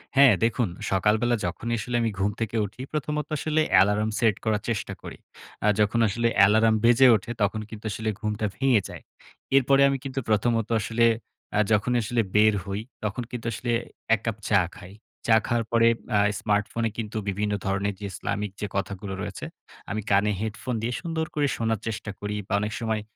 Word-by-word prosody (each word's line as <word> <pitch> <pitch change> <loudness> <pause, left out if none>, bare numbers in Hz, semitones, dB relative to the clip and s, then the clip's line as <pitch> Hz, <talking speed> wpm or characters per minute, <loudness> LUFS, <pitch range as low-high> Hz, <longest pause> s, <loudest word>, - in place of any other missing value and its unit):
হ্যাঁ, 135 -4 +8
দেখুন 115 0 +2 0.2
সকালবেলা 105 +5 +2
যখনই 115 +7 -2
আসলে 120 +3 -3
আমি 115 -2 0
ঘুম 100 +2 +1
থেকে 115 0 -2
উঠি, 105 +5 -9
প্রথমত 150 0 -2
আসলে 155 +2 +1
অ্যালার্ম 105 +3 +4
সেট 110 -4 +3
করার 105 -1 +1
চেষ্টা 115 -4 -2
করি। - - -9 0.5
আ - - +4
যখন 105 +2 +2
আসলে 115 +3 0
অ্যালার্ম 110 +3 +5
বেজে 120 +3 +6
ওঠে, 110 +3 -4
তখন 110 +1 +1
কিন্তু 110 0 -10
আসলে 110 +2 -2
ঘুমটা 105 -1 -2
ভেঙে 130 -4 +3
যায়। - - -10 0.5
এরপরে 135 +1 +5
আমি 135 - 0
কিন্তু 135 -1 -3
প্রথমত 115 +1 +2
আসলে 115 +2 +1 0.5
আ - - +4
যখন 105 +3 +2
আসলে 115 +1 0
বের 110 0 +6
হই, 100 +1 -3 0.2
তখন 105 +4 -2
কিন্তু 120 -2 -6
আসলে 120 +2 -3 0.4
এক 105 - -10
কাপ 115 -2 -2
চা 100 -3 +5 0.2
খাই। 90 +2 -12 0.3
চা 110 - +6
খাওয়ার 120 -1 0
পরে 115 0 +4 0.3
আ - - +4 0.2
স্মার্টফোনে 105 +2 0 0.4
বিভিন্ন 105 +1 -1
ধরনের 100 +1 -1 0.2
ইসলামিক 105 +1 -3
যে 105 - -1
কথাগুলো 100 0 -3
রয়েছে, 100 -2 -5 0.5
আমি 110 +1 -2
কানে 100 +2 +4
হেডফোন 110 +3 -3
দিয়ে 120 +2 -2
সুন্দর 165 -2 -2
করে 145 -1 +2
শোনার 115 -2 0
চেষ্টা 105 -1 -4
করি 105 0 -4
বা, - - -3
অনেক 105 +1 -3
সময় 110 -2 -1
110 Hz, 175 wpm, -25 LUFS, 105-120 Hz, 0.5 s, হ্যাঁ